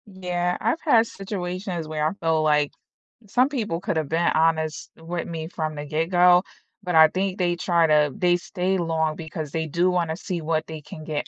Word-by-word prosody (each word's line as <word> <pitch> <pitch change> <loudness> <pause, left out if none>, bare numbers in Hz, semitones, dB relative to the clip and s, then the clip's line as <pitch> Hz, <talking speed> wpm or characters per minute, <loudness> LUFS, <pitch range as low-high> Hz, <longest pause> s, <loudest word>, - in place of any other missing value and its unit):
Yeah, 180 -3 -2
I've 325 - 0
had 230 -8 +4
situations 185 -4 -5
where 155 -1 -1
I 160 - -2
feel 160 -1 +1
like 150 -1 +2 0.6
some 250 +6 +2
people 215 -12 -2
could 200 -3 -2
have 155 -3 -2
been 165 +2 +2
honest 160 -1 +1
with 165 +1 -5
me 160 -2 -5
from 155 -2 -4
the 145 0 -6
get-go, 175 +4 +4 0.4
but 180 -2 -2
I 160 0 +9
think 190 +2 -2
they 175 -2 +1
try 170 -1 +2
to 150 -2 +3
they 175 -1 +2
stay 185 +1 -2
long 160 -2 0
because 160 -2 -6
they 160 0 -2
do 175 +4 +1
wanna 170 -3 0
see 175 0 -4
what 155 0 -1
they 160 -1 -7
can 155 +1 -10
get 155 -1 -3
170 Hz, 195 wpm, -24 LUFS, 160-180 Hz, 0.6 s, I